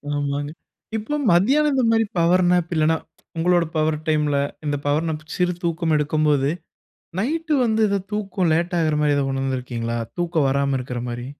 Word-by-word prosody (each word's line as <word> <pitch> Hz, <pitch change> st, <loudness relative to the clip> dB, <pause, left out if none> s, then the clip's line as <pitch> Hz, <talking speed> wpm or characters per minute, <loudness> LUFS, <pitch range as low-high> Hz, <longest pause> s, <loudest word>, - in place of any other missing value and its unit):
ஆமாங்க. 145 Hz, 0 st, -2 dB, 0.5 s
இப்போ 220 Hz, +7 st, -3 dB, 0.2 s
மதியானம் 275 Hz, +13 st, +4 dB
இந்தமாரி 225 Hz, -4 st, +3 dB
பவர் 175 Hz, +2 st, +4 dB
நேப் 175 Hz, -1 st, +1 dB
இல்லன்னா, 160 Hz, +1 st, +3 dB, 0.4 s
உங்களோட 175 Hz, +1 st, +3 dB
பவர் 155 Hz, 0 st, +1 dB
டைம்‌ல 150 Hz, -2 st, +1 dB, 0.3 s
இந்த 145 Hz, -1 st, 0 dB
பவர் 150 Hz, +3 st, +1 dB
நேப் 155 Hz, -1 st, -4 dB
சிறு 180 Hz, 0 st, +1 dB
தூக்கம் 165 Hz, -1 st, 0 dB
எடுக்கும்போது, 150 Hz, -2 st, +1 dB, 0.7 s
நைட்டு 315 Hz, -, 0 dB
வந்து 220 Hz, -1 st, +1 dB
இது 200 Hz, 0 st, 0 dB
தூக்கம் 195 Hz, -4 st, -1 dB
லேட் 170 Hz, +2 st, 0 dB
ஆகுறமாரி 150 Hz, -2 st, +2 dB
ஏதா 140 Hz, -, +1 dB
உணர்ந்திருக்கீங்களா? 125 Hz, -3 st, -2 dB, 0.2 s
தூக்கம் 165 Hz, -4 st, +1 dB
வராம 140 Hz, 0 st, +1 dB
இருக்கிறமாரி. 120 Hz, -1 st, -5 dB
160 Hz, 140 wpm, -22 LUFS, 145-180 Hz, 0.7 s, மதியானம்